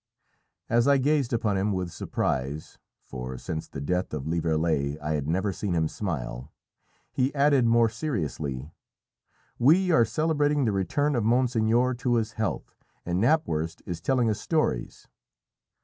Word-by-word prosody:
As 120 +2 +2
I 140 0 +5
gazed 140 -1 +1
upon 110 -4 0
him 100 +2 0
with 90 -2 -3
surprise 70 -1 -3 0.3
for 65 0 -6
since 80 +3 -5
the - - -8
death 90 +3 -1
of 70 -2 -5
Lieverlé 80 -3 0
I 75 0 -3
had 75 -2 -2
never 95 +5 0
seen 95 -1 -2
him 80 -1 +2
smile 65 - -5 0.6
he 130 +1 0
added 140 -3 +4
more 115 0 +4
seriously 80 - -4 0.9
"We 175 +9 +4
are 140 -8 +5
celebrating 145 +3 +1
the 110 - +2
return 140 +10 0
of 120 - +1
monseigneur 120 +1 +2
to 125 -1 +1
his 110 -1 0
health, 110 -2 -3 0.3
and 90 +2 0
Knapwurst 85 - 0
is 85 -2 -5
telling 125 +4 +1
us 105 -2 -1
stories." 155 - -1
105 Hz, 150 wpm, -26 LUFS, 80-125 Hz, 0.9 s, I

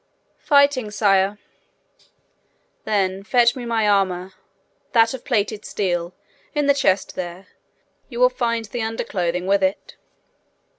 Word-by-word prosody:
'Fighting, 280 -6 +3
sire.' 200 -1 +2 1.5
'Then 195 -2 0
fetch 240 +3 +3
me 250 -2 -6
my 225 -2 0
armour 190 -2 +1 0.6
that 230 0 +4
of 260 - -7
plated 215 -4 -1
steel, 175 -3 -2 0.4
in 295 -1 +1
the 280 - +5
chest 200 -9 +1
there. 180 +1 -7 0.6
You 240 -2 -7
will 250 0 +6
find 235 -2 -2
the 230 +3 -5
underclothing 180 -5 -2
with 200 +1 +2
it.' 190 +1 -2
210 Hz, 120 wpm, -21 LUFS, 190-240 Hz, 1.5 s, will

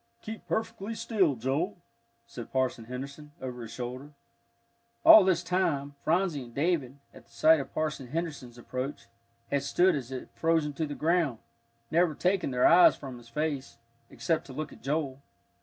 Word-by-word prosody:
"Keep 220 0 -8
perfectly 225 -1 -3
still, 190 - +1
Joel," 140 - -1 0.5
said 115 0 -9
Parson 130 -3 -1
Henderson, 140 +4 -8
over 125 -2 -6
his 115 - -7
shoulder. 130 +4 -6 0.9
All 215 - +11
this 180 -2 +2
time, 160 -6 0
Phronsie 170 -3 +1
and 120 - -15
David, 145 -4 0 0.2
at - - -16
sight 155 +7 +5
of 135 - -6
Parson 150 -4 -2
Henderson's 145 -5 -5
approach, 130 +2 -5 0.5
had 140 -1 +2
stood 175 +7 +3
as 130 -3 -5
if 130 - -7
frozen 160 -3 +1
to 155 +2 -2
the 145 - -5
ground, 160 -6 +1 0.5
never 170 -1 +3
taking 180 -1 +1
their 125 -1 +2
eyes 175 +1 +7
from 130 -4 -9
his 120 -1 -16
face, 145 0 -3 0.3
except 165 -2 -1
to 135 - -9
look 155 +2 -5
at - - -16
Joel. 140 -2 -2
145 Hz, 160 wpm, -29 LUFS, 130-170 Hz, 0.9 s, All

